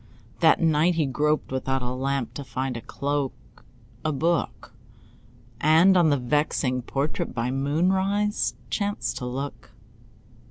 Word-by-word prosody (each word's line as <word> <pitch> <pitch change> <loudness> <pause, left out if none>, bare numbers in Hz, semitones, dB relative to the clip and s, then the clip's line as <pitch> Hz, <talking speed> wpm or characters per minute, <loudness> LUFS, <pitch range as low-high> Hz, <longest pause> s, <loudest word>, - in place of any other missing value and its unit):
That - - +5
night 165 +1 +3
he 160 -2 +2
groped 150 +3 0
without 130 0 -1
a 125 - -2
lamp 135 -1 -2
To 140 - -6
find 130 -1 -3
a 115 - -5
cloak, 135 -5 -4 0.4
a 155 - 0
book, 165 +3 -1 0.9
And 160 +7 +5
on 175 -3 +5
the 145 - +3
vexing 130 -1 0
portrait 140 +3 -3
By 120 +2 -1
moonrise 190 +9 +1 0.2
chanced 205 -1 -2
to 125 - -4
look. 135 +3 -6
145 Hz, 130 wpm, -25 LUFS, 130-165 Hz, 0.9 s, That